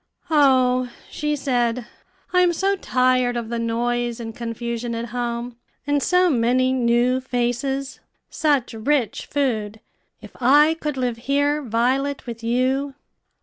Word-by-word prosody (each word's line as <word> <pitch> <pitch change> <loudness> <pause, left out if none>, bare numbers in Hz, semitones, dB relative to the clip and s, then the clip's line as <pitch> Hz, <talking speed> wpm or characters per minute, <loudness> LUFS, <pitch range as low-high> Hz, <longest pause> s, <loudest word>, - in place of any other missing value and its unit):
"O," 255 -4 +4 0.2
she 300 0 -1
said, 245 -4 0 0.5
"I 360 - +5
am 355 -1 +3
so 390 +4 +1
tired 255 -7 +1
of 230 -2 -4
the 235 0 -2
noise 240 +1 -1
and 225 -1 -7
confusion 235 0 -4
at 230 +1 -4
home, 240 0 -4 0.3
and 290 0 +1
so 360 +5 +3
many 255 -2 +2
new 245 +1 +2
faces, 260 +2 -2 0.3
such 285 -6 0
rich 240 +2 -1
food. 220 -7 -1 0.4
If - - -12
I 295 +5 +5
could 300 -4 -3
live 245 -3 -1
here, 285 +1 +2
Violet, 265 +3 0
with 230 -2 -7
you!" 260 +4 0
250 Hz, 135 wpm, -22 LUFS, 235-280 Hz, 0.5 s, I